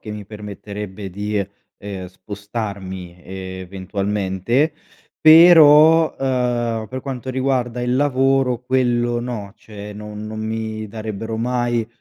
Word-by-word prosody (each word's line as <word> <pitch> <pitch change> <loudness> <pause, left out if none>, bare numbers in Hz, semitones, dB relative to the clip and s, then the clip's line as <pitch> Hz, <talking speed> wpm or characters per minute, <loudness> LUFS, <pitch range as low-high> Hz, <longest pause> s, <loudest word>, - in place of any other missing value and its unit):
che 105 - -8
mi 105 -1 -6
permetterebbe 105 -1 -8
di, 105 +3 -3 0.4
ehm, 100 -3 -7
spostarmi 95 -2 -7
eventualmente. 95 - -2 0.5
Però, 160 -1 +8
uhm, 120 -4 -1
per 130 0 -5
quanto 130 -2 -6
riguarda 130 -2 -1
il 125 0 0
lavoro 135 -2 +2
quello 120 -2 +1
no, 110 -5 -5
cioè 105 -1 -10
no 105 0 -9
non 110 +1 -6
mi 110 0 -4
darebbero 110 +1 -5
mai, 120 -1 0
110 Hz, 110 wpm, -20 LUFS, 100-125 Hz, 0.5 s, Però